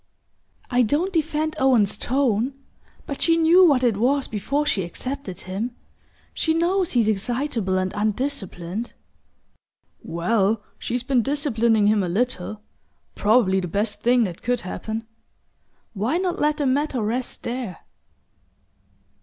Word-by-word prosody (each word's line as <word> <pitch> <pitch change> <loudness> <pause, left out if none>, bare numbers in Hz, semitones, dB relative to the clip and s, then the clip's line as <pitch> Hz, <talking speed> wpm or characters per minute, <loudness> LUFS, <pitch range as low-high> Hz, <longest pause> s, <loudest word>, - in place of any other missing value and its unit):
"I 250 0 +4
don't 305 - +1
defend 315 -1 0
Owen's 250 -7 +3
tone 250 +1 0 0.5
but 280 - -6
she 330 -1 +4
knew 335 +3 +6
what 280 -7 +4
it 230 -5 +2
was 270 +5 +2
before 275 +8 -1
she 215 -9 +1
accepted 190 +2 -5
him. 210 +7 -4 0.6
She 320 -1 0
knows 355 +2 +1
he's 235 -4 +3
excitable 220 -2 0
and 185 +1 -1
undisciplined." 210 -3 -2 1.1
"Well, 205 +5 0 0.2
she's 245 +1 -2
been 255 -1 +2
disciplining 235 -6 +1
him 210 0 +3
a 180 - -1
little 215 0 -2 0.5
probably 205 -3 +3
the 180 - -3
best 205 +3 -2
thing 245 +1 +4
that 180 -5 -4
could 245 0 0
happen. 220 +5 -5 0.9
Why 225 - 0
not 360 -1 -1
let 300 0 +2
the 290 - -1
matter 275 0 +1
rest 240 +4 -3
there?" 235 -7 -4
240 Hz, 130 wpm, -23 LUFS, 205-280 Hz, 1.1 s, knew